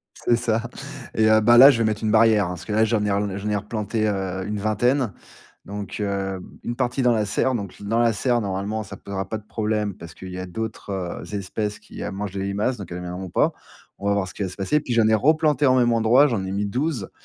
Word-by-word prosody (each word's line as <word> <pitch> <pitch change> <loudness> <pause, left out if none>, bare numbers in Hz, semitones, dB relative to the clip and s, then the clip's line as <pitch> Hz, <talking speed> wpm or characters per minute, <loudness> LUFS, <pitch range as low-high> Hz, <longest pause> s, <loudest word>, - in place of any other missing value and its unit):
C'est 120 - +1
ça, 115 -1 0 0.5
et 110 0 +3
heu, 110 0 +6
bah, 120 +2 +6
là, 135 +3 +11
je 120 - +1
vais 115 - +2
mettre 110 0 -1
une 110 - +1
barrière, 110 -3 +5
hein, - - -4
parce 90 0 -7
que 105 - -5
là, 110 +1 +4
j'en 110 -2 +1
ai 105 - 0
relan 100 -1 -1
j'en 105 +2 -4
ai 105 - +1
replantées, 110 +1 -2
heu, 95 -2 -2
une 105 0 -3
vingtaine, 110 +3 +1 0.5
donc, 100 0 -6
heu, 95 -2 -2 0.2
une 120 - -2
partie 125 +1 0
dans 125 -1 +4
la 110 -2 +1
serre, 130 +5 0
donc 100 -4 -5
dans 115 +3 0
la 115 -1 +4
serre, 120 +3 +1
normalement, 100 +2 -2
ça 100 - -9
posera 95 -1 -5
pas 110 - -3
de 105 - -15
problème 105 -2 -1
parce 85 -1 -11
qu'il 95 -1 -9
y 90 - -6
a 95 - -4
d'autres, 110 +2 -6 0.4
heu, - - -6
espèces 105 +2 -3
qui, - - -10
heu, - - -3
mangent 100 0 -5
les 95 - -2
limaces, 105 +5 -1
donc 95 -4 -8
elles 90 - -5
viendront 90 +1 -6
pas. - - +2 0.5
On 100 - -5
va 100 - +3
voir 100 -2 -1
ce - - -9
qui 105 - -4
va 95 - -2
se 95 - -9
passer. 100 +10 +1
Puis 125 - -3
j'en 115 -2 +4
ai 110 - +4
replantées 150 +4 +3
en 130 - +5
même 120 -2 +3
endroit, 115 +5 +5
j'en 110 -7 -1
ai 95 - -4
mis 100 +1 -1
12,, 125 - -2
105 Hz, 265 wpm, -23 LUFS, 100-115 Hz, 0.5 s, là